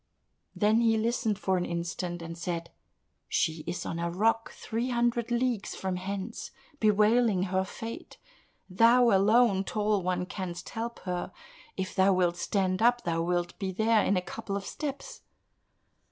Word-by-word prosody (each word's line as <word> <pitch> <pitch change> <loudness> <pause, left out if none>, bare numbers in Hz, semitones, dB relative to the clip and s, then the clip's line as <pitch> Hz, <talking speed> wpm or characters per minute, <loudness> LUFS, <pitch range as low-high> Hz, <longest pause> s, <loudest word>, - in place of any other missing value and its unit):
Then 215 +2 +3
he 225 -1 +3
listened 220 -2 0
for 190 -2 0
an 175 - -1
instant 175 0 -4
and 165 0 -6
said, 170 -1 -4 0.6
"She 160 -1 0
is 175 +1 -3
on 165 - -3
a 170 0 -1
rock, 225 +5 +1
three 235 +3 -3
hundred 240 -1 +1
leagues 240 -3 -1
from 190 -1 -3
hence, 195 +4 -5 0.3
bewailing 215 -1 +3
her 190 0 +2
fate. 225 +4 -8 0.5
Thou 230 +5 +5
alone, 200 0 +4
Tall 210 0 0
One, 180 0 -1
canst 180 -3 -6
help 235 +1 -5
her; 180 -1 -3 0.5
if 190 -1 -3
thou 190 0 +4
wilt 175 -2 +1
stand 185 0 0
up, 240 +1 +4
thou 165 -1 0
wilt 175 0 -1
be 190 -2 -2
there 220 +2 +3
in 195 - +2
a 180 - -1
couple 200 0 -5
of 200 - -6
steps." 280 -3 -6
195 Hz, 155 wpm, -29 LUFS, 180-225 Hz, 0.6 s, Thou